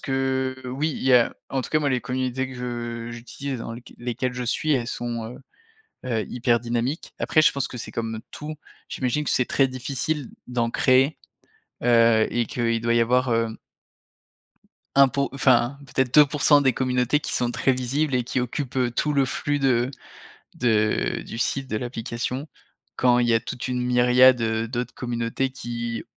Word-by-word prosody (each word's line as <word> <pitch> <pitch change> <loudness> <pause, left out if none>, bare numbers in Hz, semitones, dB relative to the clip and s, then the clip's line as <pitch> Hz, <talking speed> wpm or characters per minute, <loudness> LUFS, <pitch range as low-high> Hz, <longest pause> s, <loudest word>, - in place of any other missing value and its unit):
que 130 -1 -1
oui. 135 +5 -1
Il - - -6
y 130 - +4
a 120 -2 +4 0.2
en 135 -1 -1
tout - - -8
cas 155 - +3
moi 150 -2 0
les 130 -2 +1
communautés 130 +1 -2
que 130 - -9
je 120 -1 -5
j'utilise 125 +2 -6
dans 115 - -6
lesq 120 +1 -11
lesquelles 125 +1 -2
je 125 - -4
suis 150 +5 0
elles 120 -3 0
sont, 120 -1 -4
heu - - -11 0.7
heu, 115 -4 -1
hyper 120 -1 +1
dynamiques. 120 +5 -3
Après 155 - +3
je 155 - +6
pense 140 -1 -2
que 125 - -7
c'est - - -7
comme 115 -1 -3
tout. 155 +1 -7 0.3
J'imagine 130 +3 -1
que - - -2
c'est 125 - +2
très 135 -1 +2
difficile 135 +2 -3 0.2
d'en 120 -2 0
créer, 130 +5 +3 0.7
heu, 115 -2 +5
et 120 -2 0
qu'il 115 -1 -1
doit 115 0 +2
y 120 - +4
avoir, 125 +1 +2
hem 115 -1 -1 1.4
1 140 -1 +7
po 140 +2 -1
enfin 130 0 +3
peut-être 130 0 -1
2% 145 0 +6
des 130 -2 +3
communautés 125 +1 +1
qui - - -5
sont 120 -1 0
très 130 +2 +1
visibles 130 +3 -1
et 125 - +2
qui 125 - -3
occupent, 125 +2 -3
heu, 125 -2 +2
tout 150 +4 0
le 140 -1 +3
flux 145 +3 -1
de 130 -2 +2 0.7
de 110 -3 +1
du 115 - -7
site 135 +2 -1
de 110 - -3
l'application, 125 +4 -4 0.5
quand 125 -1 +4
il 120 -1 +2
y 115 - +3
a 115 - +4
toute 125 +2 -6
une 125 -1 -1
myriade, 125 0 +5
heu, 110 0 0
d'autres 120 +1 -4
communautés 120 +2 -2
qui 120 -3 -5
125 Hz, 185 wpm, -24 LUFS, 120-135 Hz, 1.4 s, 1